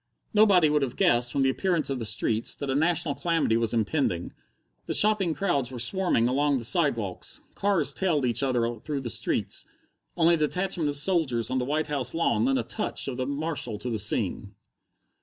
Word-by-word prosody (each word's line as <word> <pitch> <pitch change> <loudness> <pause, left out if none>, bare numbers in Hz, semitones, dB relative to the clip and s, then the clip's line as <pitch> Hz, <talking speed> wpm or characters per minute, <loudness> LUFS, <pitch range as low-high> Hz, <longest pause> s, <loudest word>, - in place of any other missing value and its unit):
Nobody 200 -6 +5
would 150 0 +2
have 135 -3 -2
guessed, 120 0 +2
from 140 - +1
the 135 - +3
appearance 170 -1 0
of 135 - -2
the 115 - -4
streets, 110 +1 -1
that 140 -1 -4
a - - 0
national 160 0 +1
calamity 165 -8 0
was 115 -1 0
impending. 115 - -1 0.6
The - - +1
shopping 205 -6 +3
crowds 140 -11 0
were 130 - -8
swarming 120 -1 +1
along 140 +2 +1
the 120 - -5
sidewalks, 115 - -1
cars 200 -3 +1
tailed 165 -8 0
each 120 +1 +1
other 120 -4 0
through 145 +3 -4
the 120 -3 -3
streets; - - -2 0.5
only 170 0 +4
a - - +3
detachment 170 0 0
of 145 - -1
soldiers 145 -8 +1
on 130 - +1
the 125 - -2
White 150 +3 0
House 140 -4 -3
lawn 165 +7 +1
lent 270 0 +2
a - - -1
touch 215 - -3
of 130 -3 -4
the 130 0 -2
martial 140 -6 -2
to 125 +3 -5
the 110 - -2
scene. 100 -1 -2
140 Hz, 195 wpm, -26 LUFS, 120-170 Hz, 0.6 s, Nobody